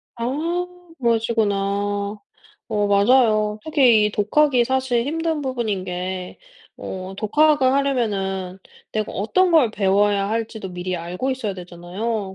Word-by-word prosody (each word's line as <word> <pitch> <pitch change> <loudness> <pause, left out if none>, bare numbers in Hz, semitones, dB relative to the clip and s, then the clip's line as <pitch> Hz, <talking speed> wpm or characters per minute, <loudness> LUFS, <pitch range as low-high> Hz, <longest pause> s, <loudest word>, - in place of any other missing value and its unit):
아. 320 +9 -2 0.3
그러시구나. 225 -3 +1 1.1
어 205 -1 0
맞아요. 215 0 +3
특히 250 -9 +4
이 - - -2
독학이 245 +5 +2
사실 260 -2 0
힘든 325 0 -1
부분인 230 -8 -2
게 180 0 -5 0.4
어 185 0 -6
독학을 290 +4 +3
하려면은 200 -9 -1 0.3
내가 215 -1 -2
어떤 355 - +1
걸 295 -9 +4
배워야 200 0 +1
할 225 0 -1
지도 200 -4 -8
미리 180 0 -4
알고 180 +10 -3
있어야 230 -6 -2
되잖아요. 190 +4 -5
220 Hz, 265 characters per minute, -22 LUFS, 195-260 Hz, 1.1 s, 특히